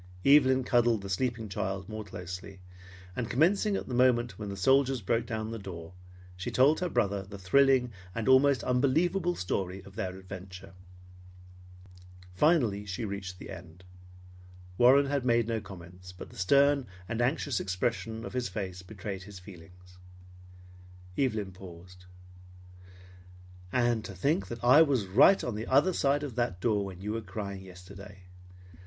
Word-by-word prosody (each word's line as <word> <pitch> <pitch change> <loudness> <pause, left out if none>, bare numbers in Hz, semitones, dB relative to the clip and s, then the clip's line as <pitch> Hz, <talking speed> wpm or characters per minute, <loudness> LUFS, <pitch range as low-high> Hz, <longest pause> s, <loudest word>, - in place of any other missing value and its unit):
Evelyn 130 -2 +5
cuddled 120 -4 +2
the 100 - -6
sleeping 115 +2 -1
child 95 -1 -4
more 110 0 -6
closely, 95 0 -8 0.6
and 120 -2 -3
commencing 195 - +2
at - - -4
the 125 - -5
moment 120 -2 +2
when 105 -2 -5
the 100 - -6
soldiers 135 +5 +3
broke 115 +3 -1
down 110 -1 -4
the 115 - -5
door, 90 -3 -9 0.4
she 95 - -5
told 140 +5 +4
her 180 - -1
brother 100 -7 0
the 100 +1 -10
thrilling 125 +5 +3 0.2
and 115 0 -3
almost 130 -1 +5
unbelievable 165 +8 +1
story 90 +1 -3
of 100 0 -15
their 95 -4 -4
adventure. 95 0 -10 1.6
Finally 120 - +2
she 105 +2 -5
reached 100 -3 -6
the - - -10
end. 90 -1 -11 0.9
Warren 130 +6 +6
had 140 -1 -1
made 120 -2 +2
no 115 -2 -1
comments, 90 -2 -12
but 90 - -11
the - - -15
stern 140 +7 +3 0.2
and 115 +3 -2
anxious 130 -1 0
expression 110 +4 -3
of - - -8
his 125 -2 -2
face 95 -4 -5
betrayed 95 0 -7
his 100 +1 -11
feelings. 90 0 -15 1.2
Evelyn 110 -8 -1
paused. 90 -1 -13 1.7
"And 120 -2 +1
to 95 - -8
think 150 - 0
that 120 0 -8
I 130 +6 +7
was 135 -9 +2
right 115 - +5
on 120 - -2
the 110 +2 -5
other 145 +8 +3
side 145 -1 +1
of 140 -4 -5
that 120 -7 -1
door 105 0 +1
when 95 -1 -9
you 105 +2 -3
were 115 - -3
crying 100 -1 -6
yesterday! 95 +1 -12
110 Hz, 155 wpm, -29 LUFS, 95-130 Hz, 1.7 s, I